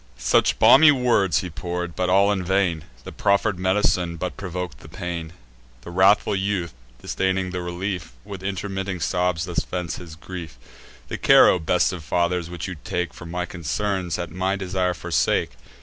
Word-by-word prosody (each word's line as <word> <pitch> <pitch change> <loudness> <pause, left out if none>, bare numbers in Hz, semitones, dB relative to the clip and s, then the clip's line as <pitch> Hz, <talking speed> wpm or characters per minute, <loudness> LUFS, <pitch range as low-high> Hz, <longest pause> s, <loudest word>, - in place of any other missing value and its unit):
Such 60 - +2
balmy 150 +3 +8
words 120 -9 +2
he 90 -3 -6
pour'd, 85 +1 -4
but 90 0 0
all 100 +2 +4
in 95 -3 -1
vain: 90 -3 0 0.2
The - - -8
proffer'd 100 -1 +1
med'cine 95 -2 +1
but 90 +2 -4
provok'd 90 -7 -5
the - - -13
pain. 85 -2 -5 0.5
The 85 - -9
wrathful 95 +3 +4
youth, 95 -3 -1 0.3
disdaining 95 -1 -1
the 90 0 -3
relief, 90 -4 -4
With 100 -2 -8
intermitting 95 -1 -3
sobs 90 -1 0
thus 90 -1 -2
vents 90 -2 -4
his 85 -3 -10
grief: 85 -1 -8 0.5
"The - - -5
care, - - +7
O 90 - +2
best 90 +3 +1
of 85 -3 -7
fathers, 85 +1 0
which 90 0 -5
you 95 -3 -6
take 90 -2 -2
For 85 - -10
my 90 +1 -3
concerns, 90 +1 -2
at 85 -2 -5
my 95 +3 -1
desire 95 -2 -1
forsake. - - 0
90 Hz, 170 wpm, -23 LUFS, 85-95 Hz, 0.5 s, balmy